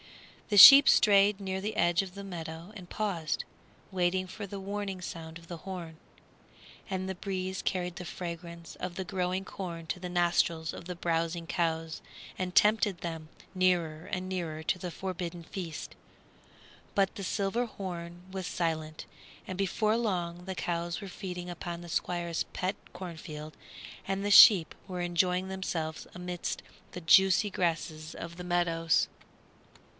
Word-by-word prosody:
The 205 - +2
sheep 275 +7 +12
strayed 200 -1 +5
near 190 -1 -3
the 210 +2 -3
edge 175 +1 +3
of 190 -2 -8
the 200 - -7
meadow 170 +1 -7
and 180 -3 -10
paused, 180 -7 -2 0.5
waiting 185 0 +1
for 205 +3 -7
the 195 +1 -6
warning 200 -1 -4
sound 165 -2 -7
of 165 0 -16
the 170 - -6
horn. 175 -2 -7 0.9
And 190 -1 -2
the 190 - -3
breeze 190 0 -3
carried 180 -2 -2
the 180 - -6
fragrance 170 -1 -7
of 180 -1 -5
the 190 - -4
growing 185 +1 -2
corn 170 -5 -6
to 180 - -3
the 180 0 -5
nostrils 170 -2 +1
of - - -9
the 180 0 -5
browsing 165 0 -1
cows 165 -2 -1 0.4
and 180 -1 -3
tempted 210 -2 +4
them 165 -2 -6 0.3
nearer 175 -3 +1
and 185 -1 -2
nearer 170 -4 -3
to 180 - 0
the 180 0 -5
forbidden 175 -2 -5
feast. 165 -1 -6 1.0
But 195 0 +2
the 200 - -6
silver 200 +5 0
horn 175 -4 -7
was 190 -2 -4
silent, 160 -3 -2 0.4
and 185 - -5
before 210 +3 +1
long 180 -6 -2
the 190 0 -4
cows 170 -1 -2
were 200 - -7
feeding 180 -2 -6
upon 175 0 -5
the 175 0 -10
Squire's 170 -1 -1
pet 185 +2 -1 0.2
cornfield 160 -4 -8 0.5
and 195 +1 -2
the 205 - +1
sheep 195 -5 +9
were 180 -2 -5
enjoying 180 +1 +1
themselves 170 -4 -4
amidst 180 0 -4 0.3
the 180 - -7
juicy 190 +4 +5
grasses 160 -3 -2
of 170 0 -7
the 180 - -7
meadows. 165 -2 +2
180 Hz, 155 wpm, -30 LUFS, 170-190 Hz, 1.0 s, sheep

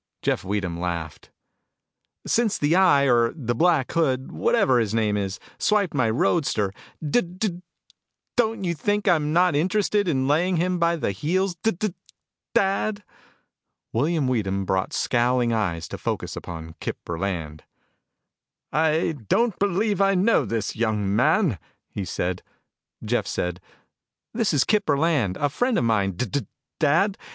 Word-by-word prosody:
Jeff - - 0
Weedham 95 -3 -2
laughed. 85 -3 -4 1.0
"Since 225 -3 +1
the 150 +3 +2
Eye 180 -7 +5
or 120 -3 +3
the 120 -7 -2
Black 160 0 +2
Hood, 135 -5 0
whatever 135 - +2
his 110 -1 -1
name 105 -2 +1
is, 100 0 -3 0.2
swiped 210 -4 +1
my 130 -6 +2
roadster, 105 - +1 0.3
d 195 +12 +3
d 180 +1 -4 0.7
don't 225 -4 +1
you 175 -2 0
think 205 +6 -1
I'm 150 -3 +3
not 175 -1 +3
interested 200 +5 +1
in 135 -5 +1
laying 170 +5 +2
him 180 +1 0
by 170 0 +2
the 155 - -1
heels, 180 - 0
D 225 - +2
d 210 -1 -2 0.6
dad." 205 +2 +1 0.9
William 150 +4 +1
Weedham 100 -6 -1
brought 95 0 0
scowling 120 -1 +1
eyes 85 -7 -1
to - - -6
focus - - -3
upon 80 -1 -7
Kip - - -4
Burland. 85 -3 -3 1.1
"I 160 +1 +1
don't 235 -4 +2
believe 200 +1 +1
I 195 0 +4
know 200 +6 +3
this 115 -3 -2
young 105 -3 0
man," 150 - +2 0.3
he 100 - -4
said. 90 +1 -2 0.6
Jeff - - 0
said, 90 0 -3 0.7
"This 225 -2 +1
is 145 -4 +3
Kip 210 -2 +1
Burland, 140 - +1
a 145 - +1
friend 245 - 0
of - - +1
mine, 105 -4 +1
D 110 +9 -2
d 125 0 -3 0.3
dad. 170 +7 +2
145 Hz, 145 wpm, -24 LUFS, -, 1.1 s, Eye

